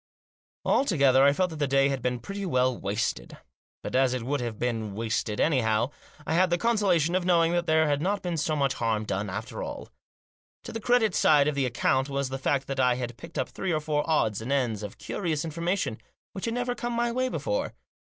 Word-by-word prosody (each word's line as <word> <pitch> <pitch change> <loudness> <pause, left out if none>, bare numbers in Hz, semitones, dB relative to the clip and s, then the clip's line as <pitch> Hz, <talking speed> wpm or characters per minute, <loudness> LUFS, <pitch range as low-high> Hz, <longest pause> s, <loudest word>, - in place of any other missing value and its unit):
Altogether, 140 - +4
I 140 - +6
felt 180 +4 0
that 160 - -7
the 145 -1 0
day 135 +1 +3
had 135 -2 -2
been 125 +1 -1
pretty 200 +10 -6
well 130 -7 +1
wasted. 100 - -3 0.5
But - - -4
as 130 -1 +3
it 125 - -4
would 140 +4 -1
probably 120 - -2
have 115 -3 -5
been 110 -4 -2
wasted 110 -1 -2
anyhow, 120 -4 +2 0.3
I - - -1
had 180 +2 +4
the 175 - +2
consolation 190 -7 +2
of 185 0 +1
knowing 170 -2 +3
that 175 0 0
there 160 0 +4
had 145 -1 +1
not 195 +4 -1
been 175 -2 -2
so 155 0 0
much 140 -3 +1
harm 110 -3 -1
done 105 0 -2
after 110 +4 -5
all. - - -6 0.7
To - - -7
the 225 - -4
credit 235 -3 +3
side 145 -3 +4
of 150 - +1
the 140 -2 0
account 130 +3 +1
was 140 -1 -1
the 135 0 -4
fact 135 0 0
that 135 -1 -4
I 125 -1 +4
had 120 -1 -4
picked 165 +6 -10
up - - -1
three 190 - -3
or 155 - +1
four 150 -1 -1
odds 110 -10 +1
and 120 +5 -4
ends 120 -7 0
of 105 -2 -7
curious 165 -5 -2
information 170 - -2 0.3
which 190 - -5
had 230 0 -2
never 245 0 -1
come 240 -1 -4
my 235 0 0
way 255 +2 0
before. - - -2
140 Hz, 225 wpm, -27 LUFS, 125-175 Hz, 0.7 s, I